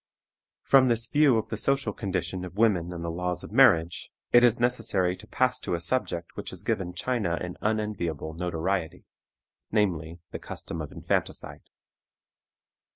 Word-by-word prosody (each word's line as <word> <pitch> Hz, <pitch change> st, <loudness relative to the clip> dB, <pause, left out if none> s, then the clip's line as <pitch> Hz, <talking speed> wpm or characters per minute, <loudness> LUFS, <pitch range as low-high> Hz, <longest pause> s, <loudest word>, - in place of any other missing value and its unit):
From 135 Hz, -1 st, +5 dB
this 115 Hz, -1 st, +4 dB
view 145 Hz, -2 st, +4 dB
of 110 Hz, -, -2 dB
the 110 Hz, -, -3 dB
social 135 Hz, +5 st, +1 dB
condition 90 Hz, -3 st, -3 dB
of 90 Hz, +1 st, -9 dB
women 95 Hz, -6 st, +2 dB
and 85 Hz, -1 st, -6 dB
the 85 Hz, -, -2 dB
laws 90 Hz, +1 st, -3 dB
of -, -, -9 dB
marriage, 80 Hz, +1 st, +4 dB, 0.2 s
it 120 Hz, 0 st, +7 dB
is 120 Hz, -1 st, +4 dB
necessary 115 Hz, -7 st, +1 dB
to 110 Hz, -, -14 dB
pass 125 Hz, +1 st, +1 dB
to -, -, -2 dB
a -, -, -3 dB
subject 85 Hz, -4 st, -2 dB
which -, -, -6 dB
has -, -, -8 dB
given 90 Hz, -1 st, -2 dB
China 100 Hz, -5 st, -1 dB
an 90 Hz, 0 st, -5 dB
unenviable 100 Hz, -8 st, -2 dB
notoriety, 90 Hz, +1 st, -2 dB, 0.7 s
namely, 85 Hz, -6 st, 0 dB
the -, -, -5 dB
custom 80 Hz, -, -6 dB
of 75 Hz, -, -7 dB
infanticide. -, -, -3 dB
95 Hz, 155 wpm, -27 LUFS, 85-115 Hz, 0.7 s, it